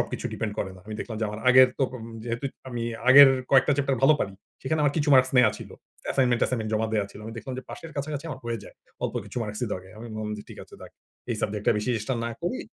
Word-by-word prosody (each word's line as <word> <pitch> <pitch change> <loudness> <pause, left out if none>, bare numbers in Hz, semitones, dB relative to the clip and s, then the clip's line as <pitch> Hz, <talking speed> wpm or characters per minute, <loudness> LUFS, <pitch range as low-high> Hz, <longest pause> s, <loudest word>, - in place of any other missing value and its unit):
সবকিছু - - -4
ডিপেন্ড 110 -2 -3
করে 95 - -2
না। - - -15
আমি 110 - -6
দেখলাম 110 - -5
যে - - +1
আমার 105 +1 -6
আগের 130 0 +8
তপ 135 - +1 0.3
যেহেতু 120 +2 -4 0.2
আমি 120 -2 -4 0.3
আগের 140 +1 +10 0.2
কয়েকটা 135 +1 +5
চ্যাপ্টার 140 -2 +1
ভালো 150 +3 +7
পারি। 100 - -1 0.3
সেখানে 155 +4 0
আমার 145 -1 +3
কিছু 150 -1 0
মার্কস 130 0 +5
নেয়া 120 -3 +6
ছিল। - - -10 0.4
অ্যাসাইনমেন্ট-টাইমেন্ট 120 -3 +1
জমা 110 +1 +1
দেওয়া 105 -2 +1
ছিল। - - -12
আমি 115 - -7
দেখলাম 130 +3 -6
যে 130 - -6
পাশের 165 - -8
কাছাকাছি 145 +1 -4
আমার 130 -2 -7
হয়ে 115 -1 -2
যায়। - - -13 0.3
অল্প - - -2
কিছু - - -12
মার্কসই 105 +3 -4
লাগে। 95 0 -6
আমি 120 - -8
বললাম 110 0 -4
যে 105 - -8
ঠিক - - -11
আছে, - - -16
যাক - - -11 0.4
এই - - 0
সাবজেক্টটা 105 +2 +1
বেশি 105 +4 -2
চেষ্টা 110 +5 -2
না 120 - -2
করি। 175 +9 -2
120 Hz, 240 wpm, -26 LUFS, 110-135 Hz, 0.4 s, আগের